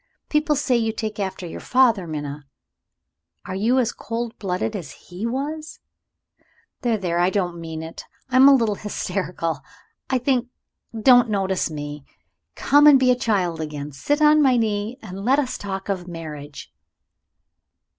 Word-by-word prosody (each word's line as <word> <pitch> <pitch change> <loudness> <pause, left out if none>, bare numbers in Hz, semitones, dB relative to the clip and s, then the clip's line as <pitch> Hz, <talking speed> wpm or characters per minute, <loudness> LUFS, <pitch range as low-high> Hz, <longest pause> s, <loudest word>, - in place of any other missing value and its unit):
People 300 0 +2
say 270 -3 +1
you 225 -1 0
take 215 -1 -5
after 190 -2 -3
your 165 - -7
father, 235 -8 +3
Minna. 145 -2 -6 1.0
Are - - -5
you 225 +7 +1
as 240 -2 +2
cold 230 0 -5
blooded 195 +2 -2
as 170 -8 -5
he 185 +6 -7
was? 300 +5 -4 1.0
There! 235 -3 +1
there! 175 -3 -1
I 175 +1 +3
don't 175 -3 -2
mean 160 -1 -6
it; 165 +1 -9 0.3
I 255 - +3
am 265 +1 +8
a 280 - +7
little 230 -5 +1
hysterical, 180 -6 -3 0.5
I 260 - +2
think 250 -1 0 0.5
don't 245 +1 +6
notice 190 -3 0
me. 145 -2 -6 0.5
Come 290 +1 +5
and 285 -3 +8
be 255 -1 +4
a - - +4
child 190 -9 0
again. 150 -1 -5
Sit 290 - 0
on 300 0 +6
my 260 -3 +4
knee, 215 +1 -1
and 195 -1 -7
let 260 +5 +3
us 275 -4 -1
talk 195 -1 -5
of 195 -2 -1
your 175 - -14
marriage." 150 - -8
205 Hz, 165 wpm, -22 LUFS, 170-250 Hz, 1.0 s, am